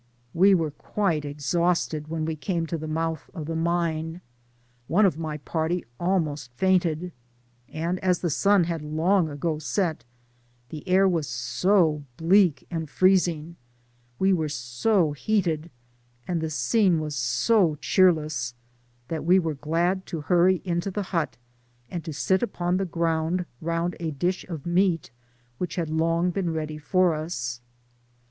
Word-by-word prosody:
We 190 +3 +6
were 160 -4 0
quite 160 -1 -1
exhausted 155 +1 0
when 160 0 -2
we 160 0 -2
came 165 +2 -2
to 165 +1 -3
the 155 - -5
mouth 160 0 -2
of 160 -4 -5
the 165 +1 -3
mine; 165 0 -1 0.7
one 195 +8 +4
of 170 -5 +1
my 155 -2 -3
party 160 +4 -2
almost 155 -8 -1
fainted; 180 -1 +1 0.6
and 170 +3 -2
as 180 -1 +2
the 175 - 0
sun 200 +4 +4
had 165 -2 -2
long 160 +4 +1
ago 150 +2 -2
set, 160 - -1 0.7
the 155 -2 -8
air 190 +1 +5
was 165 -6 0
so 150 +7 +1
bleak 175 -1 +3
and 160 -3 -3
freezing 170 -2 +2 0.3
— 120 0 -38
we 190 0 +3
were 160 -4 0
so 150 - +1
lwated 170 -2 0 0.6
and 175 -3 -1
the 160 - -2
scene 185 +2 +2
was 150 -1 -4
so 150 - +2
cheerless, 155 -8 +2 0.5
that 160 -3 -3
we 180 +4 +5
were 165 -4 0
glad 170 +6 -1
to 160 -3 -5
huny 180 +3 +3
into 175 +1 -1
the 205 +2 -3
hut, 165 -3 -1 0.5
and 170 -2 -4
to 160 - -4
sit 150 +7 +1
upon 180 -6 -1
the 190 0 -1
grovmd 165 +1 0 0.2
round 170 +2 -1
a 165 -1 -2
dish 175 +5 -2
of 160 -5 -6
meat, 175 -5 +1 0.5
which 180 - -3
had 170 -3 -2
Icmg 165 +2 +1
been 180 -3 -1
ready 155 -1 -4
for 180 +3 +2
us. 125 -6 -4
165 Hz, 155 wpm, -25 LUFS, 155-180 Hz, 0.7 s, We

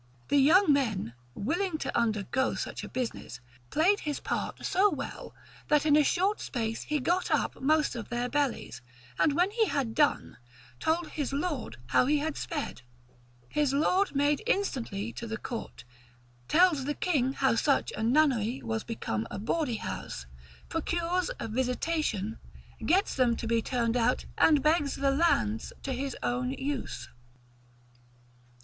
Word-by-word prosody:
The 285 - +4
young 315 +4 +6
man, 220 - 0 0.2
willing 335 - -1
to - - -4
undergo 230 +3 +1
such - - -4
a - - -7
business, 230 - -4 0.3
played 370 +7 +3
his 295 -2 -3
part - - -3
so 395 +3 +4
well, - - -6 0.3
that 300 0 +3
in 300 - +4
short 380 +8 +1
space 225 -3 -3
he 300 0 -1
got 350 +7 0
up - - 0
most 305 0 +2
of 230 -3 -6
their 240 0 -1
bellies, 285 -2 -1 0.4
and 300 - +4
when 360 +4 +3
he 445 0 +2
had 275 -6 -1
done, 295 +4 +1 0.4
told 330 - 0
his 290 -3 -3
lord 280 - -3
how 250 - +4
he 300 +1 +3
had 305 +1 -2
sped: 295 - -4 0.7
his 295 -2 +1
lord 360 +5 +2
made 285 +1 +2
instantly 235 - -1
to 235 - -6
the 220 0 -3
court, 230 +1 -6 0.6
tells 335 -6 +4
the 295 +1 -1
king 270 -7 +1
how 265 -2 +2
such 275 +4 +2
a - - -4
nunnery 245 -1 +2
was 220 -1 -2
become 115 - -3
a - - -5
bawdy 245 +4 -1
house, 60 - -5 0.4
procures 345 +4 -1
a - - -3
visitation, 250 - -1 0.4
gets 380 +4 +2
them 245 -3 +2
to 230 - -5
be 230 0 +2
turned 235 -1 0
out, 235 -2 +1
and 300 -4 +4
begs 305 -2 +2
the 275 0 +1
lands 195 - +1
to 270 - -2
his 270 +1 -3
own 250 +1 -1
use. 275 0 -4
275 Hz, 155 wpm, -29 LUFS, 235-315 Hz, 0.7 s, young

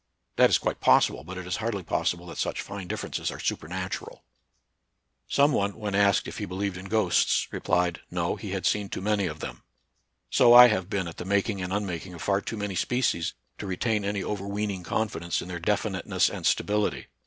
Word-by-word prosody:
That - - +6
is - - +5
quite - - -2
possible, - - +4
but 95 +3 -8
it 90 - -6
is 90 - -2
hardly 110 -3 -2
possible 85 +1 -1
that 85 - -8
such - - -1
fine 100 -2 -7
differences - - -3
are - - -7
supernatural. 90 +4 -4 1.0
Some 140 +1 +4
one 100 -6 0
when 105 -2 -4
asked 100 0 +3
if - - -7
he - - -2
believed 95 +1 -3
in 95 +1 -8
ghosts, 100 -3 +2
replied. 90 -1 0
No, 85 -1 -1
he 105 - -7
had 95 0 -3
seen 105 -2 +1
too - - -4
many 100 -1 +1
of 75 -1 -6
them. - - -6 0.7
So 120 0 +6
I 125 0 +11
have 95 -4 -1
been 100 -5 -1
at 85 - -8
the - - -5
making 100 +1 0
and 90 0 -4
unmaking 95 -3 -3
of 85 - -8
far 100 0 +1
too 115 - -5
many 105 -1 -3
species 115 -5 0 0.2
to 105 - -5
retain 105 +3 0
any 100 -1 -2
overweening 100 -1 -3
confidence 85 -2 -2
in 90 - -7
their 90 -1 -4
definiteness - - 0
and - - -2
stability. 105 0 0
100 Hz, 200 wpm, -27 LUFS, 90-105 Hz, 1.0 s, I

